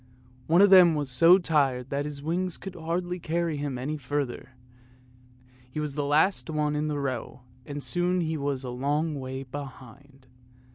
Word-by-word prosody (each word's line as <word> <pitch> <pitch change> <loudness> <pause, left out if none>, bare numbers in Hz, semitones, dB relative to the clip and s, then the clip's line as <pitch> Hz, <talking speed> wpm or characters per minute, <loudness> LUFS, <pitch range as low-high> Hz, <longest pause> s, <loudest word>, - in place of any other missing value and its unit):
One 170 +4 +5
of 200 - +5
them 180 -4 +8
was 145 -3 -2
so 165 +8 +7
tired 140 -8 0
that 140 +1 -1
his 145 -1 -6
wings 175 +3 -2
could 195 - -8
hardly 175 +2 -3
carry 170 -1 -1
him 140 -3 -3
any 145 +5 -3
further; 135 -2 -4 1.2
he 140 - -5
was 150 -2 -3
the 145 0 -2
last 145 0 +2
one 150 -1 0
in 150 +1 -1
the 150 -1 -2
row, 130 -3 -4 0.3
and 145 0 -6
soon 180 +1 +1
he 160 -1 -1
was 140 -2 -2
a 125 - -5
long 145 +4 -1
way 130 0 -5
behind. 135 0 -11
145 Hz, 175 wpm, -27 LUFS, 135-165 Hz, 1.2 s, them